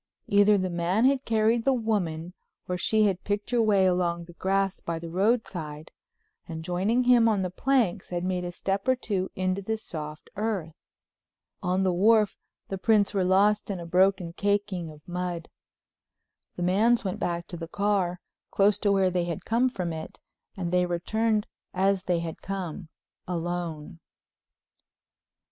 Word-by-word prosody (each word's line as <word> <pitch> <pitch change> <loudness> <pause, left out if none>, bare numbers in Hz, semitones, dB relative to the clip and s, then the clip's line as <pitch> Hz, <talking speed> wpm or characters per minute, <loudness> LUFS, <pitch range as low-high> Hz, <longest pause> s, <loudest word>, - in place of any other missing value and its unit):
Either 205 +1 +5
the 185 -1 0
man 175 +7 +1
had 270 0 +2
carried 225 +1 +2
the 270 - +3
woman 180 -8 -2 0.3
or 180 - -1
she 215 +4 +2
had 190 -3 0
picked 205 +3 -2
her 240 -1 +3
way 205 -4 +4
along 175 -2 +1
the 175 - -13
grass 195 +2 0
by 170 -1 -4
the 165 0 -7
roadside, 175 -7 -1 0.6
and 160 -1 -6
joining 195 +8 +1
him 245 -2 +5
on 205 -3 +1
the 180 - -3
planks 220 -4 +1
had 175 -1 -3
made 180 -1 -1
a 175 - -4
step 195 +5 -2
or 260 - +4
two 195 -6 -2
into 185 +1 -1
the 220 +3 -2
soft 155 -7 -8
earth. 200 -7 -2 0.9
On 185 +1 +1
the 185 -1 +2
wharf 210 +3 +4 0.3
the 195 - -4
prints 210 0 +3
were 195 -2 +1
lost 200 +4 +3
in 195 -3 -3
a 170 - -7
broken 185 0 +2
caking 200 -3 -1
of 150 -1 -15
mud. 175 -2 -4 1.1
The 175 - -3
man's 215 +7 +3
went 190 -2 -3
back 170 -1 -2
to 175 - -6
the 165 0 -6
car, 190 -1 0 0.3
close 205 0 +3
to 205 -1 +2
where 190 -2 +3
they 175 -1 0
had 170 -3 -5
come 240 +3 +2
from 180 -8 -3
it, 160 - -8 0.4
and 175 -2 -3
they 180 0 +3
returned 215 +5 0 0.3
as 190 0 +1
they 175 -2 +1
had 165 -1 -6
come—alone. 175 -3 -5
190 Hz, 165 wpm, -27 LUFS, 175-210 Hz, 1.1 s, Either